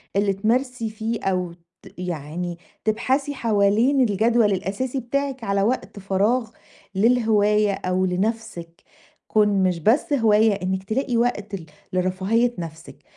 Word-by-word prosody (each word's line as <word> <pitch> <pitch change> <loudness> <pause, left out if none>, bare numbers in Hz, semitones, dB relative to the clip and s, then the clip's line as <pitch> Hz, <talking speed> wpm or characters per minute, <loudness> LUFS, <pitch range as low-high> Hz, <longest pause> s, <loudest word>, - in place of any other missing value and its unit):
اللي 200 0 +2
تمارسي 235 +3 -1
فيه 220 +1 -4
أو 180 -2 -1
ت 170 +2 -20
يعني 175 0 -4 0.3
تبحثي 265 +6 0
حوالين 225 +3 +2
الجدول 225 0 +3
الأساسي 205 +8 -2
بتاعِك 270 +1 -3
على 200 -1 0
وقت 210 -2 -1
فراغ 205 +5 +1 0.5
للهواية 210 -1 +3
أو 185 -1 -1
لنَفْسِك. 180 -3 -3 0.5
كون 210 -2 +3
مش 180 -2 +1
بس 235 - +2
هواية 220 -4 +4
إنِك 190 +1 -1
تلاقي 240 +4 -1
وقت 210 -4 -1
ل 175 -4 -8 0.3
لرفاهية 190 +6 +1
نَفْسِك. 165 -1 -9
210 Hz, 125 wpm, -23 LUFS, 185-235 Hz, 0.5 s, هواية